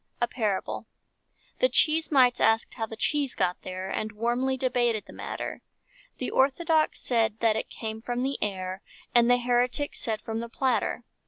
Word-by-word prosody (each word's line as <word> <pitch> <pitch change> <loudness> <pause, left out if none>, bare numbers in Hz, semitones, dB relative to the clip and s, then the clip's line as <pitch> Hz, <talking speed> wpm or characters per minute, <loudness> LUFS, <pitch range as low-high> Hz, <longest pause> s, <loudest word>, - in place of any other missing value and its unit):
A 240 - +2
PARABLE 215 -6 -2 0.7
The - - +4
cheese 320 +1 +3
mites 255 -4 +5
asked 225 0 +3
how 225 -2 -3
the 225 - -7
cheese 280 +4 0
got 180 0 0
there, 185 0 -5
And 215 +2 -3
warmly 240 +4 0
debated 245 -4 +1
the - - -13
matter; - - -5 0.6
The - - -3
Orthodox 310 +4 +2
said 225 -3 +1
that 225 -2 +4
it - - -3
came 220 -1 -6
from 245 +1 -2
the 275 +1 -2
air, 185 -2 -3 0.3
And 240 0 +5
the 245 - +6
Heretics 245 +3 0
said 220 -2 -3
from 225 0 -3
the 235 0 -5
platter. 245 -1 0
240 Hz, 170 wpm, -27 LUFS, 220-260 Hz, 0.7 s, the